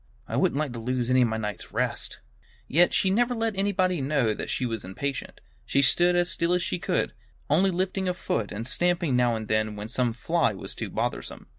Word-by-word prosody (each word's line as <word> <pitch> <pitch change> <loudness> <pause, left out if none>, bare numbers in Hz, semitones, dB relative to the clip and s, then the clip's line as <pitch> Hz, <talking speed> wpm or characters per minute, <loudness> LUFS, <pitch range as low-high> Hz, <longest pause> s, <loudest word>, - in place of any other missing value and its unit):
"I - - -3
wouldn't - - +2
like 150 -4 -1
to 120 - -5
lose 125 +1 -1
any 130 0 +5
of 120 - +4
my 110 0 -2
night's 105 -3 -5
rest." - - -2 0.5
Yet 175 +5 +4
she 190 - +2
never 240 +4 +2
let 225 -2 -1
anybody 185 -4 +1
know 135 -5 +1
that - - -5
she 130 - 0
was 115 -3 -3
impatient. 135 +9 -4 0.2
She 140 - +2
stood 175 +6 +4
as 175 0 +3
still 170 +1 +1
as 180 - 0
she 90 - -2
could, - - 0 0.4
only 185 +6 +4
lifting 185 +1 -1
a 180 - -1
foot 115 - -2
and 110 +3 -4
stamping 175 -2 +1
now 120 -1 +3
and 110 -1 -5
then 110 -1 0
when 105 +1 -6
some 125 -1 0
fly 160 +1 +1
was - - -7
too - - -5
bothersome. - - -3
140 Hz, 220 wpm, -26 LUFS, 115-180 Hz, 0.5 s, any